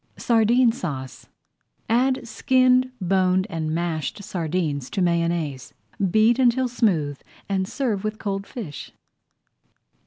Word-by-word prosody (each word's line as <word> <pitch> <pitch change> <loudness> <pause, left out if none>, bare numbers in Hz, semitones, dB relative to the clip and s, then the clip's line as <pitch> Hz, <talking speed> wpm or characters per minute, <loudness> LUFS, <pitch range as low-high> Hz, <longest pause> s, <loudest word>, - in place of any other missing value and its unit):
SARDINE 235 +1 +3
SAUCE 135 - -6 0.6
Add 250 +1 +1
skinned, 255 0 +3
boned, 185 0 +2
and 160 -2 -2
mashed 165 +2 -2
sardines 160 -7 -2
to - - -3
Mayonnaise. 170 -6 -1 0.3
Beat 220 +6 +4
until 255 0 +3
smooth 170 - 0 0.3
and 190 -1 -1
serve 225 -7 -2
with 215 0 -3
cold 195 -2 -4
fish. 185 - -8
190 Hz, 105 wpm, -23 LUFS, 165-235 Hz, 0.6 s, Beat